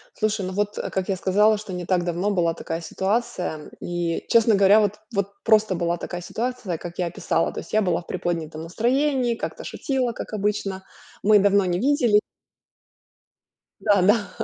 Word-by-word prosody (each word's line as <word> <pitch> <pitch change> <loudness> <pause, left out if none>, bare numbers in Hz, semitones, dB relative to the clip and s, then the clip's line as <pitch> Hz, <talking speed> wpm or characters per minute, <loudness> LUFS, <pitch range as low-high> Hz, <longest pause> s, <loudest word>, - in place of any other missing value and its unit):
Слушай, 215 -2 -1
ну, 185 - -4
вот, 205 +1 -1
э, - - -3
как 190 0 -2
я 195 - +1
сказала, 205 +4 +3
что 205 -3 -8
не 180 -1 -4
так 180 -1 +1
давно 175 +3 -1
была 175 -4 +1
такая 165 0 -5
ситуация, 185 -4 -2
и, 175 -1 -2
честно 230 -1 +5
говоря, 200 +2 +6
вот 210 -1 0
вот 200 -1 -1
просто 215 -3 +4
была 170 0 -1
такая 175 +1 -6
ситуация, 230 -3 -3
как 175 +2 -9
я 175 - +1
описала. 165 0 -1
То - - -5
есть - - -14
я 215 - +4
была 180 -4 0
в - - -21
приподнятом 165 -3 -3
настроении, 245 - +1
как-то - - -6
шутила, 260 - -2
как 220 - -8
обычно. 200 -2 -2 0.4
Мы 210 0 +6
давно 200 0 +4
не 175 -1 0
видели 245 -4 +3 1.6
да-да, 205 0 +3
200 Hz, 175 wpm, -23 LUFS, 175-215 Hz, 1.6 s, говоря